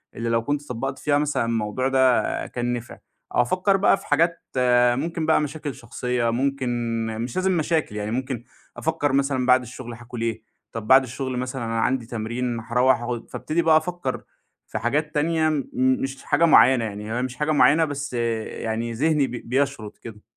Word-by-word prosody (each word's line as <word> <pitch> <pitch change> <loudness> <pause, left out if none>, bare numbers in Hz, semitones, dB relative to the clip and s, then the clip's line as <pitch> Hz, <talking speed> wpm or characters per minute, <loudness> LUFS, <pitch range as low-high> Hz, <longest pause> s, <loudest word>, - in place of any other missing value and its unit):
اللي 115 0 -3
لو 115 0 +1
كنت 145 +2 -2
طبقت 135 +3 -4
فيها 145 -1 +2
مثلًا 145 -4 0
الموضوع 115 +2 -1
ده 130 -2 +4 0.3
كان 120 0 -2
نفع، 120 -1 -6 0.4
أو - - +5
أفكر 185 +10 +2
بقى 195 0 +4
في - - -13
حاجات 165 +3 +2 0.6
ممكن 165 +4 -2
بقى 160 0 +3
مشاكل 150 -1 -4
شخصية، 120 0 -2
ممكن 135 +2 -1 0.4
مش 115 +2 -4
لازم 185 -1 +1
مشاكل 155 -7 0
يعني 105 0 -3
ممكن 130 -1 -3 0.3
أفكر 145 -2 0
مثلًا 135 -2 +1
بعد 130 0 +5
الشغل 120 0 -8
هاكل 120 0 -8
إيه؟ 115 -1 -2 0.3
طب 110 -2 -6
بعد 130 0 +7
الشغل 130 0 -4
مثلًا 125 -1 -3
أنا 115 0 -1
عندي 125 +1 0
تمرين 120 +1 -3
هاروّح 125 +2 +2
أخ 120 -1 -3
فابتدي 160 +2 -1
بقى 160 -2 +5
أفكر 160 -5 -3 0.4
في - - -4
حاجات 150 +6 -1
تانية، 160 +1 +2
م 150 -3 0
مش 130 +1 0
حاجة 155 +4 +3
معينة، 130 -6 +6
يعني 105 0 -6
هي 120 - -1
مش 130 0 -4
حاجة 150 +2 -1
معينة 155 +2 +5
بس 145 -2 -5
يعني 115 0 -2
ذهني 150 +2 +2
بي 120 - -5
بيشرد 130 -4 -1
كده. 105 -2 -10
130 Hz, 180 wpm, -23 LUFS, 115-145 Hz, 0.6 s, بعد